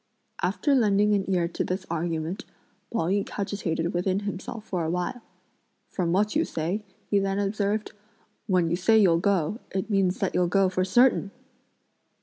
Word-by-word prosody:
After 290 Hz, -, +1 dB
lending 210 Hz, -4 st, +3 dB
an 195 Hz, -1 st, 0 dB
ear 175 Hz, -3 st, +2 dB
to -, -, -2 dB
this 185 Hz, +1 st, -3 dB
argument, 165 Hz, +1 st, -2 dB, 0.5 s
Pao 230 Hz, -, 0 dB
yü 195 Hz, +4 st, +1 dB
cogitated 175 Hz, -5 st, -3 dB
within 185 Hz, +2 st, 0 dB
himself 210 Hz, +3 st, -5 dB
for 180 Hz, -5 st, -2 dB
a 160 Hz, -, -1 dB
while. 180 Hz, +8 st, -2 dB, 0.7 s
"From 175 Hz, -3 st, -1 dB
what 205 Hz, +3 st, +1 dB
you -, -, +3 dB
say," 175 Hz, +7 st, -3 dB, 0.3 s
he 200 Hz, -, +4 dB
then 195 Hz, 0 st, -1 dB
observed, 205 Hz, +1 st, -1 dB, 0.6 s
"when 180 Hz, -4 st, +2 dB
you -, -, +2 dB
say 220 Hz, +5 st, +4 dB
you'll 180 Hz, -6 st, +5 dB
go, 195 Hz, +1 st, +1 dB
it 190 Hz, +3 st, -3 dB
means 195 Hz, -2 st, +2 dB
that 195 Hz, -, -1 dB
you'll 180 Hz, -1 st, +2 dB
go 195 Hz, +1 st, +3 dB
for 185 Hz, 0 st, 0 dB
certain!" 220 Hz, +2 st, +3 dB
195 Hz, 165 wpm, -26 LUFS, 175-205 Hz, 0.7 s, you'll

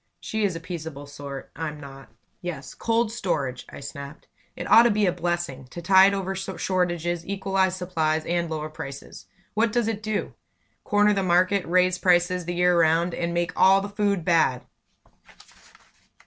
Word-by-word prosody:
She 220 Hz, -1 st, -3 dB
is 195 Hz, -4 st, 0 dB
a -, -, -4 dB
peaceable 160 Hz, -4 st, -7 dB
sort; 140 Hz, -1 st, -8 dB
I'm 150 Hz, -1 st, -5 dB
not. 135 Hz, -3 st, -11 dB, 0.3 s
"Yes, 155 Hz, -7 st, -6 dB
cold 230 Hz, -1 st, 0 dB
storage!" 140 Hz, -, -3 dB
I -, -, -10 dB
snapped. 140 Hz, +1 st, -9 dB, 0.3 s
"It -, -, -6 dB
ought 230 Hz, -, +8 dB
to 240 Hz, -, +4 dB
be 210 Hz, -1 st, +2 dB
a 180 Hz, -, +3 dB
blessing 175 Hz, -7 st, -3 dB
to 170 Hz, -, -8 dB
tide 190 Hz, +3 st, +5 dB
over 195 Hz, -1 st, -3 dB
shortages, 175 Hz, -2 st, -2 dB
equalize 190 Hz, -1 st, 0 dB
supplies, 160 Hz, -4 st, -1 dB
and 170 Hz, -1 st, -1 dB
lower 155 Hz, -1 st, -4 dB
prices. 140 Hz, -2 st, -9 dB, 0.3 s
What 225 Hz, +1 st, +2 dB
does 235 Hz, 0 st, +1 dB
it 220 Hz, -2 st, -2 dB
do? 215 Hz, -1 st, -3 dB, 0.5 s
Corner 210 Hz, 0 st, +3 dB
the 200 Hz, -, 0 dB
market, 185 Hz, +2 st, +2 dB
raise 180 Hz, +1 st, +2 dB
prices 180 Hz, 0 st, +2 dB
the 175 Hz, +1 st, -3 dB
year 180 Hz, 0 st, +3 dB
round, 165 Hz, +2 st, +3 dB
and 170 Hz, 0 st, -2 dB
make 170 Hz, 0 st, -1 dB
all 190 Hz, +1 st, +6 dB
the 200 Hz, +1 st, -5 dB
food 200 Hz, -4 st, -1 dB
bad!" 160 Hz, -7 st, +2 dB
175 Hz, 165 wpm, -25 LUFS, 160-195 Hz, 0.5 s, ought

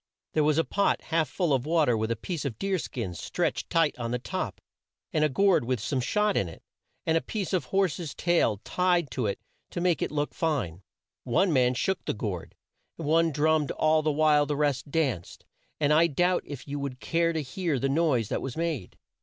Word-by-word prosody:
There 155 Hz, -, +3 dB
was 150 Hz, 0 st, +3 dB
a 165 Hz, -, +4 dB
pot 200 Hz, +3 st, +1 dB
half 160 Hz, -3 st, 0 dB
full 170 Hz, -3 st, 0 dB
of 130 Hz, +1 st, 0 dB
water 155 Hz, -7 st, +3 dB
with 110 Hz, 0 st, -1 dB
a 115 Hz, -, +1 dB
piece 160 Hz, -, -4 dB
of 130 Hz, -7 st, -4 dB
deer 195 Hz, +3 st, 0 dB
skin 115 Hz, -, -4 dB
stretched 85 Hz, -, -2 dB
tight 165 Hz, -3 st, +3 dB
on 120 Hz, -1 st, -2 dB
the 125 Hz, -, 0 dB
top, 125 Hz, -, -4 dB, 0.5 s
and 155 Hz, -, +2 dB
a 155 Hz, -, +3 dB
gourd 190 Hz, +1 st, +3 dB
with 125 Hz, 0 st, -1 dB
some 130 Hz, +5 st, -1 dB
shot 210 Hz, +9 st, +1 dB
in 90 Hz, -, +1 dB
it, 80 Hz, -, -13 dB, 0.4 s
and 160 Hz, -, +2 dB
a 165 Hz, -, +3 dB
piece 200 Hz, -4 st, -4 dB
of 185 Hz, -, +1 dB
horse's 180 Hz, -5 st, -1 dB
tail 170 Hz, -, +2 dB
tied 175 Hz, -5 st, +1 dB
to 125 Hz, -5 st, -1 dB
it 100 Hz, -, -2 dB, 0.3 s
to -, -, -4 dB
make 175 Hz, -2 st, +1 dB
it -, -, 0 dB
look 145 Hz, -1 st, -2 dB
fine. 125 Hz, -, -1 dB, 0.4 s
One 160 Hz, +9 st, +2 dB
man 125 Hz, -2 st, +3 dB
shook 190 Hz, +9 st, -1 dB
the -, -, -1 dB
gourd, 100 Hz, -6 st, -5 dB, 0.4 s
and 165 Hz, -, -5 dB
one 165 Hz, +1 st, +3 dB
drummed 155 Hz, 0 st, +2 dB
all 155 Hz, 0 st, +2 dB
the 155 Hz, 0 st, +1 dB
while 150 Hz, -1 st, +4 dB
the 145 Hz, -1 st, -1 dB
rest 145 Hz, -2 st, 0 dB
danced, 135 Hz, -, -2 dB, 0.3 s
and 150 Hz, -1 st, +3 dB
I 165 Hz, +2 st, +5 dB
doubt 175 Hz, +4 st, +2 dB
if 145 Hz, -2 st, -8 dB
you 145 Hz, +1 st, -3 dB
would 135 Hz, -2 st, -5 dB
care 170 Hz, +3 st, +1 dB
to 160 Hz, -2 st, -2 dB
hear 160 Hz, +2 st, -2 dB
the 135 Hz, -, 0 dB
noise 135 Hz, -7 st, +1 dB
that -, -, -1 dB
was 135 Hz, 0 st, -5 dB
made. 160 Hz, -, -3 dB
150 Hz, 215 wpm, -28 LUFS, 130-165 Hz, 0.5 s, I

